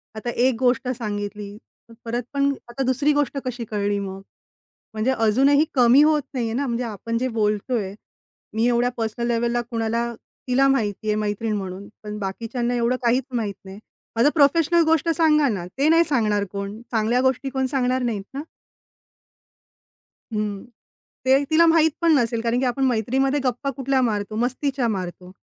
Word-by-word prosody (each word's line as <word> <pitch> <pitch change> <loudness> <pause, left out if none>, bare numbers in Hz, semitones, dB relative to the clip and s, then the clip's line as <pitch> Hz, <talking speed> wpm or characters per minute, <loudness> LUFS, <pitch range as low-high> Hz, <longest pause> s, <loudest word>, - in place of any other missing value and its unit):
आता 230 +3 -4
एक 245 +1 +2
गोष्ट 250 0 +1
सांगितली 205 -2 -5 0.5
परत 240 +1 -2
पण 280 0 +2 0.2
आता 250 +3 -3
दुसरी 265 +4 +2
गोष्ट 290 -1 0
कशी 240 -2 -4
कळली 205 -1 0
मग? 195 -1 -6 0.7
म्हणजे 220 +4 0
अजूनही 270 +7 +3
कमी 250 +1 +6
होत 305 -1 +3
नाहीये 230 -3 -2
ना, 275 +2 -1
म्हणजे 240 +1 -1
आपण 230 +1 -4
जे 255 +2 0
बोलतोय 210 -1 0 0.6
मी 230 +2 +2
एवढ्या 245 +1 +2
पर्सनल-लेव्हलला 235 +1 -1
कुणाला 230 +1 -1 0.4
तिला 270 +2 +3
माहिती 220 -5 0
आहे 210 - +2
मैत्रीण 215 +1 -2
म्हणून. 190 +1 -6 0.2
पण 210 0 -6
बाकीच्यांना 230 +5 -3
एवढं 240 +1 +1
काहीच 245 +2 +2
माहीत 215 -4 -1
नाही. 190 +2 -10 0.4
माझं 235 +6 +4
प्रोफेशनल 330 +3 +4
गोष्ट 325 0 +2
सांगा 305 -3 +4
ना, 185 -5 -3
ते 290 +3 +3
नाही 330 +1 +6
सांगणार 215 -10 +1
कोण, 200 +2 -5
चांगल्या 230 +2 +1
गोष्टी 265 +1 0
कोण 265 0 -1
सांगणार 255 -1 +1
नाहीत 220 -5 -2
ना? 275 - -4 1.9
हं. 210 -2 -2 0.6
ते 270 +2 +4
तिला 330 +2 +5
माहीतपण 325 0 +3
नसेल 230 -2 0
कारण 235 +1 0
की 260 - 0
आपण 255 +2 0
मैत्रीमध्ये 265 +4 +1
गप्पा 255 +2 -1
कुठल्या 265 0 +1
मारतो, 215 -3 -1
मस्तीच्या 255 +2 -1
मारतो. 185 -3 -5
240 Hz, 155 wpm, -23 LUFS, 215-270 Hz, 1.9 s, कमी